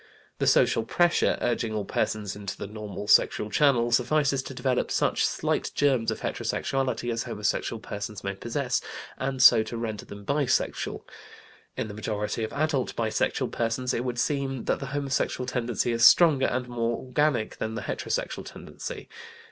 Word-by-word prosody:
The - - +1
social 115 - +4
pressure, 175 +9 +2
urging 115 -2 -1
all 105 -2 -2
persons 105 -1 -2
into 100 -2 -6
the - - -5
normal 105 -1 -7
sexual 105 0 +4
channel, 120 -2 +3
suffices 135 +3 +2
to 135 - -8
develop 125 0 0
such - - +1
slight - - 0
germs 130 -6 +2
of 110 - -3
heterosexuality 130 -3 -1
as 115 - -3
homosexual 105 +2 -2
persons 105 -1 -6
may 100 - -2
possess, 120 +5 -2 0.4
and 135 -1 0
so 120 -4 +9
to 115 +1 -5
render 110 -3 -4
them 100 0 -11
bisexual. 140 +1 0 0.7
In - - -2
the 105 - -7
majority 105 +1 -3
of 110 - -3
adult 145 -3 -1
bisexual 110 -2 0
persons 120 +2 -1
it 120 - -1
would 125 -1 -3
seem 135 -1 -1
that - - 0
the - - -5
homosexual 140 -3 -1
tendency 120 -2 -1
is 115 0 0
stronger 150 -2 +7
and 125 0 -2
more 120 -1 -1
organic 130 -3 0
than 110 0 -3
the 120 - -4
heterosexual - - -3
tendency. - - -8
120 Hz, 165 wpm, -27 LUFS, 110-135 Hz, 0.7 s, so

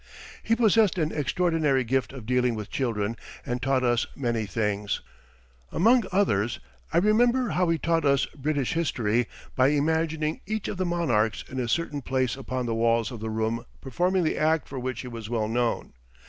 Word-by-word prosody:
He 225 - +2
possessed 220 -4 +4
an 160 -2 0
extraordinary 150 -2 +1
gift 125 -1 0
of 130 -5 -9
dealing 125 0 +1
with 105 -1 -6
children 115 -4 -1 0.3
and 120 0 -3
taught 130 0 +1
us 120 -1 +2
many 115 -5 -1
things. 105 0 -1 0.7
Among 230 +5 +4
others 120 - +1 0.3
I - - +1
remember 240 +6 +3
how 180 -2 +1
he 165 - +2
taught 165 +2 +1
us 140 -2 +3
British 145 -2 -1
history 120 -8 0 0.3
by 130 0 +4
imagining 155 +1 0
each 215 0 -2
of - - -4
the 185 -1 0
monarchs 120 -11 +1
in 130 - -5
a 125 - -1
certain 145 +2 -1
place 130 -1 0
upon 130 -2 -4
the 115 - -1
walls 115 -1 +2
of 120 - -7
the 110 +1 -4
room 110 +1 -1 0.2
performing 180 +8 0
the 155 - 0
act 155 +1 +2
for 135 - -6
which 130 0 -3
he 125 - -8
was 115 -3 -7
well 110 -3 0
known. 120 +1 -1
130 Hz, 180 wpm, -26 LUFS, 115-165 Hz, 0.7 s, possessed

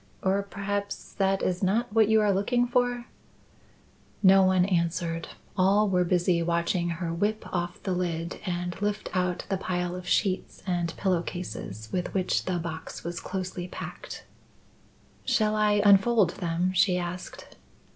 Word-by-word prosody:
Or 195 +1 +2
perhaps 200 0 -4
that 195 0 +1
is 180 0 0
not 210 +4 +1
what 220 -2 +5
you 220 0 +4
are 205 -1 +3
looking 240 +6 +2
for?" 245 0 0 1.2
No 195 0 +7
one 185 -1 +4
answered. 170 -2 -1 0.3
All 200 +3 +4
were 180 -2 +2
busy 175 -1 +2
watching 170 +1 0
her 170 0 -3
whip 205 +5 -1
off 175 -1 -3
the 190 - -2
lid 170 -2 -2
and 175 -1 -3
lift 205 0 -1
out 180 -1 0
the 195 - 0
pile 180 -1 -2
of 180 0 -8
sheets 190 0 0
and 175 -3 -1
pillow 185 -4 +1
cases 110 - -6
with 180 0 -3
which 185 -1 +1
the 185 -1 0
box 165 -1 -6
was 170 +1 -4
closely 185 -1 -4
packed. - - -8 1.0
"Shall 215 -1 +2
I 210 -1 +3
unfold 200 -1 +5
them?" 175 +2 -1
she 185 -1 +3
asked. 180 +1 -6
185 Hz, 150 wpm, -27 LUFS, 175-200 Hz, 1.2 s, No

